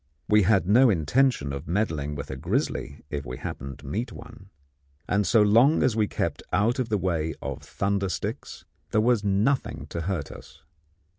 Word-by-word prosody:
We 105 0 +5
had 95 -2 +3
no 120 +5 +6
intention 90 - +1
of 70 +3 -6
meddling 80 -7 -1
with 70 - -6
a - - -4
grizzly 70 +2 -2
if 70 -2 -3
we 60 -1 -6
happened 70 0 -6
to - - -16
meet 115 +4 -3
one, 105 -2 -12 0.6
and 100 -1 +1
so 110 +1 +5
long 115 +9 +5
as 130 -4 +2
we 110 -2 +2
kept - - -2
out 105 +7 +2
of 125 - -1
the 105 - +1
way 80 -4 -1
of - - -5
thunder 100 -1 -1
sticks 75 - -5 0.2
there 110 - +2
was 115 -1 +2
nothing 105 +7 0
to 85 - -4
hurt 85 -4 -3
us. - - -13
100 Hz, 180 wpm, -26 LUFS, 80-110 Hz, 0.6 s, no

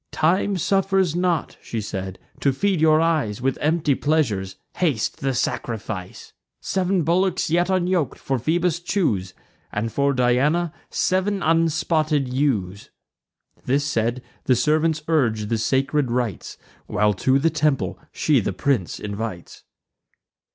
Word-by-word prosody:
"Time 185 +5 +1
suffers 190 -1 +1
not," 175 -2 0
she 115 - -4
said, 95 -3 -5 0.2
"to 140 - +2
feed 185 +5 0
your 155 -1 +5
eyes 155 -11 +1
With 130 +1 -1
empty 155 -1 +2
pleasures; 120 -11 0 0.2
haste 145 -11 0
the 135 -2 -1
sacrifice. 110 -6 -4 0.3
Sev'n 190 -2 0
bullocks, 180 +1 +1
yet 175 +2 +2
unyok'd, 180 -6 0
for 135 -2 -2
Phoebus 170 +5 0
choose, 115 - -1 0.4
And 110 +2 -2
for 140 +2 +1
Diana 140 +7 +2 0.2
sev'n 190 +2 0
unspotted 155 -4 +1
ewes." 105 -9 -1 0.8
This 140 +3 +1
said, 120 -2 -1 0.2
the 130 - +4
servants 155 +3 +1
urge 115 -10 +1
the 115 - 0
sacred 135 +3 +1
rites, 120 -5 -3 0.3
While 105 0 +2
to 130 +1 +4
the 160 +4 +2
temple 150 - 0
she - - +2
the - - -2
prince 130 -12 -1
invites. 105 -3 -6
145 Hz, 130 wpm, -22 LUFS, 115-165 Hz, 0.8 s, your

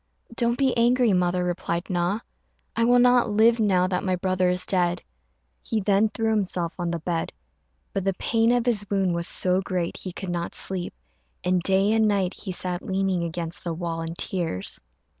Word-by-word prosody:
"Don't 235 +1 +1
be 270 -2 +2
angry, 240 -1 +3
mother," 180 0 +1
replied 175 0 -2
Na; 180 +4 -1 0.5
"I 230 - +2
will 245 +1 +5
not 245 -1 +4
live 225 +3 +4
now 190 -4 +3
that 180 -1 -1
my 185 -1 +1
brother 185 0 +1
is 180 0 -1
dead." 180 -2 0 0.6
He 225 - -1
then 205 +1 +2
threw 225 +1 -1
himself 185 -5 -1
on 175 -1 -1
the 170 - -1
bed; 165 0 -3 0.6
but 195 - -1
the 195 -1 0
pain 225 +4 +2
of 245 -1 +1
his 210 -5 +1
wound 195 -3 +1
was 170 0 -2
so 185 +1 +2
great 180 -3 -3
he 185 - -6
could 185 0 -5
not 175 -1 -3
sleep, 185 -2 -1 0.5
and 180 0 +1
day 195 +3 +3
and 220 -1 +3
night 195 -3 +1
he 195 - -6
sat 180 0 -2
leaning 190 -2 -1
against 170 0 -5
the 170 -2 -3
wall 165 -1 -3
in 165 0 -5
tears. 165 - -1
185 Hz, 190 wpm, -25 LUFS, 175-215 Hz, 0.6 s, will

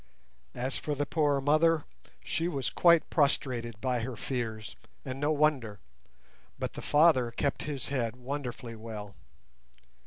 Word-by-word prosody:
As 130 +2 -1
for 150 - -3
the 145 +1 -1
poor 145 -1 +2
mother, 155 +3 +3 0.4
she 165 - -1
was 140 -7 -2
quite 170 -2 +5
prostrated 125 -6 +1
by 125 -1 0
her 120 +2 -4
fears, 110 -4 -4 0.3
and 130 0 -5
no 145 +2 +1
wonder, 140 -9 +1 0.8
but - - -3
the - - -7
father 145 -5 +4
kept 135 +4 -2
his 140 -5 -4
head 120 -4 -1
wonderfully 125 -2 -5
well. 110 -3 -8
135 Hz, 135 wpm, -30 LUFS, 120-150 Hz, 0.8 s, quite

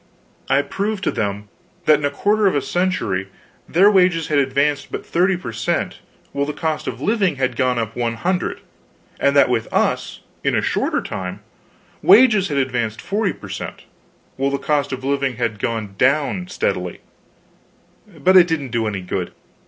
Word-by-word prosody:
I 135 +1 +3
proved 200 +6 -3
to - - +1
them 105 0 -3 0.4
that 155 -2 +5
in 145 - -2
a - - +2
quarter 205 +8 +2
of 190 - +2
a 145 - +2
century 115 - -1 0.4
their 195 +5 +5
wages 180 -5 +3
had 150 -2 +3
advanced 140 +1 0
but - - -5
30 180 +2 +2
per 125 -10 -6
cent., 115 +3 -2 0.3
while 140 0 -1
the 150 - -3
cost 160 -1 -2
of - - -5
living 205 -6 +1
had 130 -2 -1
gone 125 0 +1
up 115 -1 -3
100; 125 +10 -1 0.6
and 140 0 +2
that 140 - +6
with 120 -3 -1
us, - - 0 0.2
in - - +1
a - - +2
shorter - - 0
time, 90 -1 -5 0.6
wages 210 -1 +6
had 145 - -2
advanced 120 -5 -1
40 200 0 -1
per - - -12
cent. - - -6 0.5
while 135 +1 +1
the 140 - -1
cost 145 0 0
of 130 0 -5
living 140 -2 0
had 115 -3 -2
gone 110 -2 -3 0.5
steadily 475 - -2 1.2
down. 155 -4 -17
But 185 +4 +5
it 180 -2 +8
didn't 155 -6 -2
do 115 -2 0
any 100 -3 -3
good. 90 - -4
140 Hz, 175 wpm, -20 LUFS, 120-180 Hz, 1.2 s, it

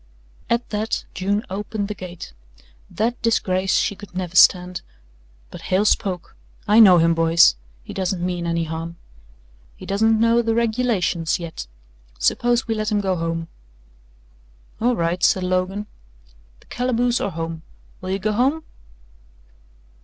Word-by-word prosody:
At 235 +1 0
that 215 +1 -2
June 200 +3 -1
opened 205 +1 -4
the 210 - -4
gate 180 - -9 0.6
that 235 +3 -2
disgrace 190 -4 +1
she 205 - 0
could 200 -3 -13
never 185 -1 -4
stand 180 0 +5 0.7
but - - -9
Hale 190 +3 +2
spoke. 190 -4 -1 0.3
"I 210 +2 +5
know 190 -5 +8
him, 165 0 +4
boys. 165 - +5 0.3
He - - -9
doesn't 185 -2 -2
mean 175 -1 -3
any 170 0 0
harm. 165 +1 -5 0.8
He - - -10
doesn't 220 +2 +2
know 230 +1 +4
the 225 -1 0
regulations 220 -8 0
yet. 165 - -7 0.5
Suppose 240 - +1
we 225 - 0
let 215 -1 -2
him 210 - +2
go 190 -2 0
home." 165 -1 -3 1.3
"All 245 +2 +2
right," 170 0 -1
said 185 - +3
Logan. 185 +3 -1 0.8
"The - - -22
calaboose 245 -1 0
or - - -1
home. 165 -1 -5 0.4
Will 185 - -6
you 190 - 0
go 210 +2 -1
home?" 270 +9 +1
190 Hz, 145 wpm, -21 LUFS, 175-225 Hz, 1.3 s, know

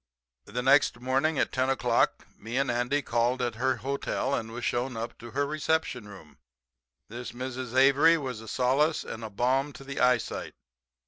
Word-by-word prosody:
"The 125 +4 -4
next 135 -2 +4
morning 135 +5 +1
at - - +1
10 130 0 0
o'clock 135 - +1
me 115 +3 -5
and 135 -2 +1
Andy 125 +4 0
called 120 +2 +1
at 120 -2 -1
her 130 0 +2
hotel, 135 +1 -2
and 115 -4 -2
was 120 +1 -5
shown 120 0 -1
up 115 +1 -5
to 120 - -9
her 140 +4 0
reception 155 -6 -1
room. 95 -7 -14 0.7
"This 120 +3 -7
Mrs. 130 0 -5
Avery 140 +5 +6
was 130 -7 -5
a 110 - -11
solace 135 +7 +1
and 115 0 -7
a 110 - -5
balm 130 +7 0
to - - -11
the 135 0 -6
eyesight. 125 -2 +1
130 Hz, 180 wpm, -28 LUFS, 120-135 Hz, 0.7 s, Avery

